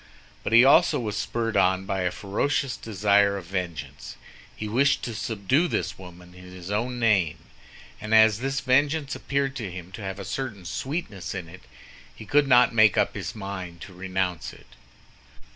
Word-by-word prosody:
But -, -, -3 dB
he 115 Hz, +2 st, +7 dB
also 165 Hz, +6 st, +5 dB
was 110 Hz, -4 st, -3 dB
spurred 115 Hz, -1 st, -2 dB
on 95 Hz, +1 st, +2 dB
by 95 Hz, -1 st, -2 dB
a 90 Hz, -, +1 dB
ferocious 125 Hz, +8 st, -1 dB
desire 100 Hz, -1 st, +2 dB
of 95 Hz, -, -8 dB
vengeance. 85 Hz, -7 st, -5 dB, 0.4 s
He 105 Hz, -, -5 dB
wished 135 Hz, +6 st, +2 dB
to 120 Hz, -, -4 dB
subdue 115 Hz, -, 0 dB
this -, -, -3 dB
woman 90 Hz, -1 st, -13 dB
in 90 Hz, 0 st, -14 dB
his 90 Hz, +1 st, -8 dB
own 120 Hz, +4 st, -1 dB
name; 100 Hz, -9 st, +2 dB, 0.6 s
and 105 Hz, +1 st, -6 dB
as 110 Hz, -1 st, +6 dB
this 135 Hz, +1 st, -2 dB
vengeance 145 Hz, +3 st, +1 dB
appeared 140 Hz, -1 st, -2 dB
to 110 Hz, -7 st, -4 dB
him 90 Hz, 0 st, -9 dB
to 105 Hz, -, -9 dB
have 95 Hz, -1 st, -5 dB
a 100 Hz, -, -7 dB
certain 110 Hz, -9 st, -5 dB
sweetness 105 Hz, -, -4 dB
in 90 Hz, -3 st, -5 dB
it, 90 Hz, +3 st, -13 dB, 0.5 s
he 110 Hz, -, -11 dB
could 145 Hz, +2 st, +3 dB
not 125 Hz, -2 st, +5 dB
make 110 Hz, -3 st, +5 dB
up -, -, +2 dB
his -, -, -5 dB
mind 95 Hz, -4 st, -6 dB
to 95 Hz, -, -10 dB
renounce 90 Hz, -1 st, -3 dB
it. -, -, -18 dB
105 Hz, 175 wpm, -25 LUFS, 95-125 Hz, 0.6 s, he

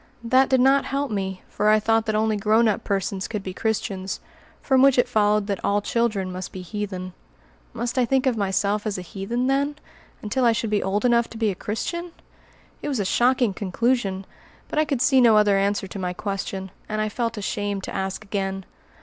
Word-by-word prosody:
That 255 Hz, +3 st, +4 dB
did 260 Hz, -1 st, +4 dB
not 270 Hz, +2 st, +4 dB
help 275 Hz, -1 st, -2 dB
me 190 Hz, -2 st, -3 dB
for 210 Hz, +1 st, 0 dB
I 215 Hz, 0 st, +5 dB
thought 225 Hz, +1 st, +1 dB
that 215 Hz, -, 0 dB
only 215 Hz, 0 st, +2 dB
grown 215 Hz, +3 st, +3 dB
up 210 Hz, -, 0 dB
persons 195 Hz, -1 st, -2 dB
could 210 Hz, -3 st, -4 dB
be 185 Hz, -, -5 dB
Christians, 195 Hz, -2 st, -2 dB, 0.4 s
from 265 Hz, -2 st, +3 dB
which 275 Hz, -1 st, +5 dB
it 245 Hz, 0 st, +4 dB
followed 210 Hz, -3 st, +2 dB
that 200 Hz, -2 st, -3 dB
all 205 Hz, +1 st, +2 dB
children 205 Hz, -3 st, -1 dB
must 185 Hz, 0 st, -6 dB
be 185 Hz, -, -7 dB
heathen. 185 Hz, -1 st, -5 dB, 0.6 s
Must 240 Hz, 0 st, -3 dB
I 250 Hz, -, +4 dB
think 265 Hz, +2 st, +1 dB
of 260 Hz, -3 st, +2 dB
Myself 200 Hz, +1 st, 0 dB
as 205 Hz, -, -2 dB
a 185 Hz, -, -5 dB
heathen, 200 Hz, +7 st, -3 dB
then, 280 Hz, +2 st, +1 dB, 0.5 s
until 230 Hz, +5 st, -1 dB
I 235 Hz, -1 st, +5 dB
should 225 Hz, -1 st, -2 dB
be 210 Hz, -, +2 dB
old 200 Hz, +4 st, -1 dB
enough 235 Hz, -1 st, +3 dB
to 225 Hz, -, -9 dB
be 220 Hz, -2 st, +1 dB
a -, -, -3 dB
Christian? 335 Hz, -, -4 dB, 0.7 s
It -, -, -4 dB
was 275 Hz, -5 st, -1 dB
a 200 Hz, -, 0 dB
shocking 245 Hz, +1 st, +2 dB
conclusion, 195 Hz, 0 st, -1 dB, 0.4 s
but -, -, -1 dB
I 310 Hz, -, +3 dB
could 275 Hz, -5 st, 0 dB
see 265 Hz, -1 st, +5 dB
no 225 Hz, -3 st, +6 dB
other 210 Hz, -1 st, +4 dB
answer 200 Hz, 0 st, +1 dB
to 195 Hz, +1 st, -7 dB
my 180 Hz, -1 st, -2 dB
question, 195 Hz, -1 st, -4 dB, 0.2 s
and 215 Hz, 0 st, -2 dB
I 215 Hz, -, +1 dB
felt 230 Hz, +1 st, -2 dB
ashamed 205 Hz, -1 st, -2 dB
to -, -, -6 dB
ask 190 Hz, +2 st, -3 dB
again. 195 Hz, -2 st, -3 dB
210 Hz, 210 wpm, -24 LUFS, 195-240 Hz, 0.7 s, no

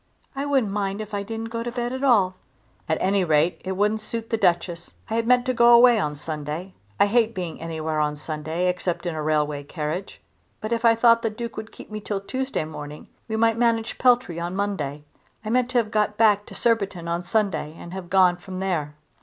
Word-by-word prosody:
"I 275 Hz, +1 st, -2 dB
wouldn't 265 Hz, -8 st, +2 dB
mind 200 Hz, -1 st, -2 dB
if 215 Hz, 0 st, -7 dB
I 200 Hz, -, -1 dB
didn't 225 Hz, +2 st, -5 dB
go 230 Hz, 0 st, -3 dB
to 240 Hz, +1 st, -3 dB
bed 240 Hz, 0 st, -3 dB
at 260 Hz, +1 st, -4 dB
all." 205 Hz, -9 st, +4 dB, 0.6 s
"At 160 Hz, -, +2 dB
any 195 Hz, 0 st, +2 dB
rate 160 Hz, +1 st, +2 dB
it 190 Hz, -, -2 dB
wouldn't 210 Hz, +3 st, +1 dB
suit 225 Hz, +1 st, -6 dB
the -, -, +3 dB
Duchess. 175 Hz, -3 st, 0 dB, 0.2 s
I -, -, 0 dB
had 230 Hz, 0 st, 0 dB
meant 250 Hz, 0 st, +4 dB
to 255 Hz, -, +1 dB
go 240 Hz, 0 st, +6 dB
away 240 Hz, -1 st, +7 dB
on 150 Hz, -6 st, -1 dB
Sunday. 155 Hz, +4 st, -5 dB, 0.3 s
I -, -, +6 dB
hate 225 Hz, +1 st, +2 dB
being 175 Hz, -4 st, -5 dB
anywhere 160 Hz, -1 st, -3 dB
on 150 Hz, 0 st, 0 dB
Sunday 155 Hz, +3 st, -3 dB
except 180 Hz, -1 st, -1 dB
in 175 Hz, -, -1 dB
a 155 Hz, -, -3 dB
railway 150 Hz, -1 st, 0 dB
carriage. 155 Hz, +5 st, -5 dB, 0.4 s
But 215 Hz, -, -5 dB
if 235 Hz, 0 st, 0 dB
I 230 Hz, 0 st, +6 dB
thought 230 Hz, 0 st, +5 dB
the 225 Hz, -, 0 dB
Duke 230 Hz, +1 st, -6 dB
would 220 Hz, 0 st, -7 dB
keep -, -, -13 dB
me 215 Hz, 0 st, -5 dB
till 205 Hz, -1 st, -3 dB
Tuesday 260 Hz, -, -3 dB
morning 150 Hz, -1 st, -9 dB, 0.2 s
we 220 Hz, -, -2 dB
might 225 Hz, 0 st, +2 dB
manage 230 Hz, -1 st, +1 dB
Peltry 245 Hz, -9 st, +3 dB
on 175 Hz, +2 st, -3 dB
Monday. 150 Hz, -8 st, -2 dB, 0.4 s
I 215 Hz, -, -2 dB
meant 250 Hz, 0 st, +2 dB
to 255 Hz, -, 0 dB
have 220 Hz, -3 st, +1 dB
got 210 Hz, -1 st, +1 dB
back 210 Hz, -2 st, +4 dB
to -, -, -11 dB
Surbiton's 200 Hz, -7 st, 0 dB
on 170 Hz, +1 st, -1 dB
Sunday 190 Hz, -5 st, -1 dB
and 175 Hz, -, -9 dB
have 190 Hz, -2 st, -7 dB
gone 185 Hz, -1 st, +4 dB
from 185 Hz, +1 st, -8 dB
there." 160 Hz, -6 st, -2 dB
200 Hz, 220 wpm, -24 LUFS, 170-230 Hz, 0.6 s, away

